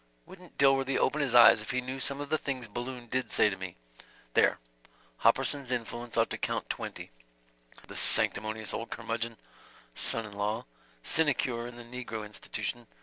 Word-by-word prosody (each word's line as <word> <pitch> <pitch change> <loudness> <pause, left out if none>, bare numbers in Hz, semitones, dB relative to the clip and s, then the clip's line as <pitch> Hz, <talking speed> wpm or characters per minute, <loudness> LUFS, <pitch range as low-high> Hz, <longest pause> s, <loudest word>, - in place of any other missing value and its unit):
Wouldn't 180 -2 -15
Dilworthy 135 -1 +4
open 150 +3 +2
his 135 -4 +1
eyes 120 -2 +9
if 105 - -9
he 125 +1 0
knew 130 +1 -5
some 140 +1 0
of 145 - -6
the 155 - +2
things 130 -4 -3
Balloon 120 +3 -5
did 130 +2 -2
say 105 - +4
to - - -3
me. 95 -2 -7 0.6
There.... - - +4 0.6
Hopperson's 130 +3 +3
influence 120 -1 -4
ought - - +3
to - - -3
count - - -1
twenty... - - -6 0.8
the - - -10
sanctimonious 110 +1 0
old 115 - -4
curmudgeon. 115 0 -3 0.6
Son 115 - -2
in 105 - -10
law... 105 +2 -2 0.4
sinecure 130 -6 +2
in 120 - -9
the 120 - -9
negro 120 -3 -6
institution. 105 -2 -4
120 Hz, 165 wpm, -30 LUFS, 110-135 Hz, 0.8 s, eyes